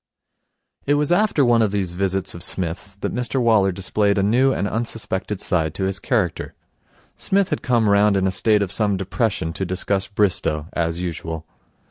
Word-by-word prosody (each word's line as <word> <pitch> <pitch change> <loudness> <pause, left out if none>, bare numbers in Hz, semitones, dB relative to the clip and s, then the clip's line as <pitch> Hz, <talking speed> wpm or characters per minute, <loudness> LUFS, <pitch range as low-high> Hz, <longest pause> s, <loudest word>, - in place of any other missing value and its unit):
It 145 - +4
was 150 +2 +1
after 175 -6 +3
one 120 -1 +4
of 110 - +3
these 95 -3 -2
visits 95 +1 -1
of 85 - -8
Psmith's 90 +2 -3
that 100 - -4
Mr 125 +2 -1
Waller 110 -5 +3
displayed 100 +2 0
a 100 - +2
new 125 +6 +3
and 100 - -1
unsuspected 105 -3 -3
side 80 -6 -1
to 95 - -3
his 95 0 -1
character. 105 - -1 0.6
Psmith 195 -1 +1
had - - -1
come 120 -4 +2
round 100 0 +4
in 95 - +1
a 95 - +1
state 105 +2 +2
of 95 - -4
some 105 -3 0
depression 95 -3 -1
to 95 - -4
discuss 95 +2 -1
Bristow, 95 -7 0
as 85 +1 -1
usual. 80 -2 -5
100 Hz, 180 wpm, -21 LUFS, 90-115 Hz, 0.6 s, It